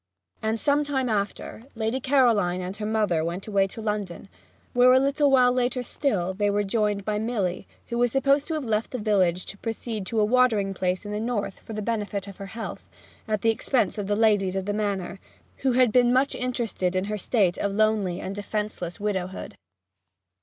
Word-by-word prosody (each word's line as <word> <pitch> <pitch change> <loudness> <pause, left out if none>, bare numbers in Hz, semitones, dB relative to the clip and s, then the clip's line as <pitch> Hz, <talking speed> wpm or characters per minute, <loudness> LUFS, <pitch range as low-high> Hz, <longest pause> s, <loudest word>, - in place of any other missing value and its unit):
And, 220 0 -1
some 290 +3 +2
time 265 -3 -1
after, 210 +2 -3
Lady 225 +3 -1
Caroline 235 -10 +3
and 185 +1 -5
her 210 0 -3
mother 210 -7 +1
went 170 +4 -3
away 200 -2 +2
to 220 +3 -9
London, 205 -4 -3 0.4
where 250 +1 +6
a 260 - +6
little 280 +2 +2
while 255 -2 +5
later 250 0 0
still 195 -10 -1
they 205 +1 +1
were 205 +1 +1
joined 205 -1 0
by 210 -1 -1
Milly, 210 -6 -2 0.2
who 235 0 -2
was 245 -1 +3
supposed 275 +2 +2
to 325 - -2
have 300 -4 -3
left 220 -1 0
the 255 - -4
village 190 -5 +1
to 200 - -8
proceed 225 -3 -4
to 225 - 0
a 210 - +4
watering 220 -4 +3
place 185 +1 -1
in 205 - -5
the 210 - -2
North 210 -4 -2
for 225 - -10
the 215 0 -4
benefit 205 -3 -2
of 195 - -10
her 195 - -7
health, 225 - -6 0.4
at 215 -2 -1
the 225 - +5
expense 225 -3 0
of 200 - -3
the 205 - +1
ladies 205 -4 +2
of 190 -1 -2
the 205 - -1
Manor, 200 -3 -2 0.4
who 265 -2 +1
had 250 -2 +4
been 245 +1 +4
much 260 +2 +2
interested 235 -7 -2
in 185 - +1
her 210 +1 -3
state 195 -4 +1
of 200 -1 -1
lonely 210 -4 +1
and 190 - -5
defenceless 205 -3 -4
widowhood. 190 -3 -3
215 Hz, 205 wpm, -25 LUFS, 195-245 Hz, 0.4 s, where